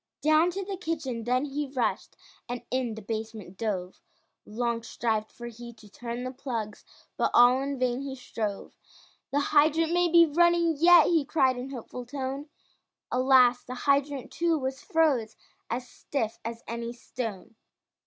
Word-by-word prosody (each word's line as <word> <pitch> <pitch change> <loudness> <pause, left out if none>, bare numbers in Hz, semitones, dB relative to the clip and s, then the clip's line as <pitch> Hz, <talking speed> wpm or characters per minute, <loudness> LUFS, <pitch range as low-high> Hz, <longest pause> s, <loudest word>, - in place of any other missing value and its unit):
Down 310 +3 +4
to 385 +2 -4
the 390 -1 -4
kitchen 300 -9 -3
then 255 +3 +1
he 290 +1 -3
rushed, 250 -5 -2 0.3
And 245 0 -4
in 255 -4 -1
the 220 - -9
basement 220 -3 -6
dove, 190 -4 -4 0.5
Long 235 +2 -2
strived 220 -2 -2
he - - -28 0.4
for - - -31
to 210 - -16
turn 240 +2 -5
the 255 - -4
plugs, 235 -5 -5 0.3
But - - +2
all 250 +2 +6
in 275 0 -3
vain 250 0 0
he 275 -1 -5
strove. 215 -5 -5 0.5
"The 285 - +1
hydrant 310 +3 +3
may 350 0 +3
be 335 0 +7
running 340 +1 +3
yet," 345 -1 +8
He 330 -4 +3
cried 265 -3 +2
in 250 +2 -6
hopeful 250 -1 -8
tone, 275 +2 -4 0.6
Alas, 250 -1 +4
the 255 - -7
hydrant 280 0 0
too, 335 0 +1
was 265 -1 -4
froze, 295 - +1 0.3
As 245 +2 -3
stiff 230 -6 -4
as 230 0 -6
any 235 0 -4
stone. 225 -5 -6
255 Hz, 160 wpm, -28 LUFS, 235-295 Hz, 0.6 s, yet